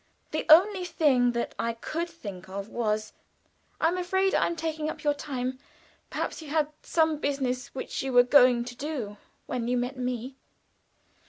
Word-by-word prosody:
The - - -2
only 375 +4 +7
thing 260 -8 +3
that 235 0 -2
I 230 0 0
could 330 +9 -4
think 200 - -9
of 200 +2 -5
was: 215 -2 -1 0.7
"I 320 - +3
am 365 +2 -2
afraid 380 +2 +1
I - - +3
am 340 - -2
taking 315 -1 -2
up - - -7
your 295 -1 +3
time. 260 -3 -4 0.5
Perhaps - - -3
you 315 - -10
had 305 -1 +1
some 315 -2 +1
business 260 -4 -1
which 260 - -4
you 270 - -2
were 245 -1 +7
going 250 -2 +5
to 245 -4 -5 0.3
when 235 -2 -3
you 250 +1 +1
met 250 +2 -2
me." 250 +1 -3
260 Hz, 170 wpm, -28 LUFS, 245-315 Hz, 0.7 s, only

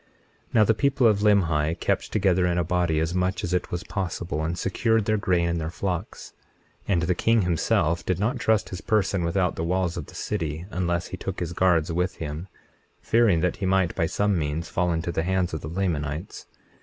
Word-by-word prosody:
21:18 - - -37 0.5
Now 110 - +7
the 110 - +3
people 135 +2 +1
of 105 -3 +4
Limhi 85 -7 +2
kept - - -1
together 95 -3 +2
in 90 0 0
a 85 - +2
body 85 -2 +1
as 80 +2 -1
much 90 +1 -1
as 90 - -2
it 90 - 0
was 90 +1 -4
possible, 90 -5 -3
and 85 +2 -2
secured 110 +3 +1
their 110 - +2
grain 90 -3 +1
and 85 -1 -1
their 80 - -3
flocks; 90 +1 -4 0.5
21:19 100 - +2
And 85 - +2
the 90 +2 +2
king 115 +5 +2
himself 85 -1 +1
did 90 0 0
not 105 +6 -1
trust 110 -2 +1
his 90 +1 -6
person 100 -4 +1
without 90 +1 0
the 80 - -2
walls 90 0 0
of 80 - -5
the - - -14
city, 80 -5 -3
unless 85 -1 -1
he 90 - -6
took 95 +1 -5
his 85 -1 -3
guards 85 -2 +2
with 90 +2 -1
him, 80 +3 -5 0.5
fearing 110 -8 +3
that 90 0 0
he 95 - -2
might 95 -2 +2
by 85 -3 0
some 100 +1 +1
means 75 +2 -3
fall 90 0 0
into 85 +1 -1
the 80 - -1
hands 90 0 0
of 80 - -3
the 75 - -6
Lamanites. 80 -2 -3
90 Hz, 220 wpm, -25 LUFS, 85-95 Hz, 0.5 s, Now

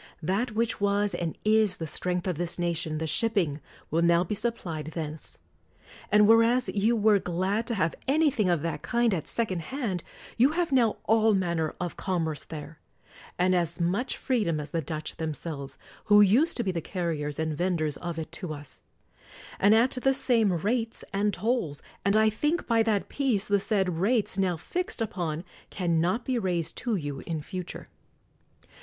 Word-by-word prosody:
That 205 +8 0
which 225 -1 -1
was 205 0 +1
and 165 -2 -3
is 215 -3 +4
the 165 - -4
strength 180 +3 -2
of 180 -4 -2
this 175 -1 -1
nation, 170 -3 -1
the 160 - -2
shipping, 170 -6 +1 0.3
will 165 +2 +2
now 170 0 +4
be 185 - -3
sup 235 +3 -1
plied 155 -4 -5
thence. 155 -2 -5 0.7
And 210 0 +6
whereas 230 +3 +4
you 215 +4 +2
were 210 -2 +4
glad 190 +6 -1
to 235 - 0
have 165 -5 +1
anything 275 - +3
of 170 -4 +1
that 155 -3 -3
kind 235 -2 +1
at 165 -5 -3
second 210 -7 -1
hand, 205 - -3 0.3
you 260 +6 +4
have 345 -2 0
now 240 -5 +3
all 220 -1 +4
manner 170 -4 -1
of 175 -1 -4
commerce 165 -6 -2
there, 150 -1 -8 0.6
and 185 +1 +3
at 180 - +4
as 170 +1 -5
much 190 +9 0
freedom 210 - 0
as 150 - -7
the 165 - 0
Dutch 155 +1 -5
themselves, 150 -3 -5 0.3
who 205 0 +6
used 245 - +4
to 240 - 0
be 195 - 0
the 170 -2 -3
carriers 155 -5 -3
and 160 -1 -1
venders 160 -3 0
of 170 -2 -5
it 160 - -5
to 170 -6 -5
us; 145 -2 -12 0.8
and 205 +2 +6
at 240 +4 +4
the 270 +1 +1
same 230 -6 +3
rates 225 +7 -1
and 205 +1 +1
tolls; 200 - -1 0.2
and 200 +1 +2
I 220 0 +5
think, 300 +10 0
by 230 -1 +3
that 220 -3 +1
peace, 245 -8 0
the 205 -1 +3
said 190 -5 0
rates 215 +1 +1
now 180 -3 +1
fixed 355 - -3
upon 175 -7 -2 0.3
can 170 -4 0
not 185 +8 0
be 255 -2 0
raised 175 -5 -1
to 235 -3 -1
you 145 -6 -4
in 160 -3 -3
future. 180 +2 -6
185 Hz, 185 wpm, -27 LUFS, 165-225 Hz, 0.8 s, And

